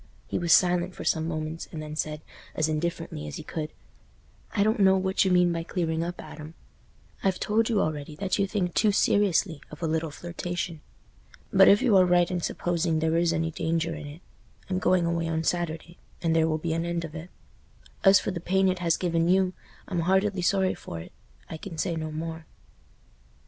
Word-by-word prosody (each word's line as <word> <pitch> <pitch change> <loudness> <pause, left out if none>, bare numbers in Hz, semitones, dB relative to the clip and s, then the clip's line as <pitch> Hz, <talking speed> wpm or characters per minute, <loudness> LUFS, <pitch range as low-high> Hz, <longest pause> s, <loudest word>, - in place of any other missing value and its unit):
He - - -2
was 170 -1 0
silent 180 +1 +4
for - - -7
some 160 0 +1
moments, 155 0 -4
and 160 - -6
then 155 0 -6
said, 155 -1 -3 0.3
as 155 - +1
indifferently 160 - -3
as 75 - -6
he - - -7
could, 155 -1 -5 0.8
"I 200 - +2
don't 215 +1 +1
know 190 -1 +5
what 190 0 +1
you 190 - +1
mean 180 -1 +4
by 165 - -2
clearing 165 -1 -2
up, 175 +1 -5
Adam. 155 +1 -9 0.7
I've 190 -1 +1
told 220 +2 +1
you 220 -3 +2
already 150 -3 -2
that 190 +5 -1
you 200 - +2
think 185 -4 -1
too 215 - +3
seriously 195 -5 +2
of 150 +2 -10
a - - +1
little 160 0 -1
flirtation. 175 0 -5 0.7
But 195 0 +7
if 205 +5 +6
you 235 -6 +4
are 185 - +6
right 175 0 +3
in 180 -1 -1
supposing 170 -1 0
there 160 +1 +1
is 170 0 +3
any 165 0 -1
danger 165 +1 -1
in 155 -2 -7
it—I'm 180 +4 -8
going 185 -1 +3
away 170 0 0
on 160 0 -1
Saturday, 170 0 -2 0.2
and 165 -1 +1
there 160 0 +4
will 155 -1 0
be 160 +1 -2
an 165 0 -1
end 170 0 -2
of 155 - -9
it. 165 +2 -8 0.7
As 195 0 +7
for - - -3
the 180 - -4
pain 190 +2 +2
it 185 -1 -1
has 170 -2 +1
given 170 -2 +1
you, 185 0 +3 0.3
I'm 180 -3 -2
heartily 190 +3 +1
sorry 190 +1 +2
for 85 - -8
it. 80 - -10 0.4
I 160 - -6
can 165 0 -8
say 170 +1 -1
no 155 -1 -4
more." 160 +1 -5
170 Hz, 205 wpm, -27 LUFS, 160-185 Hz, 0.8 s, But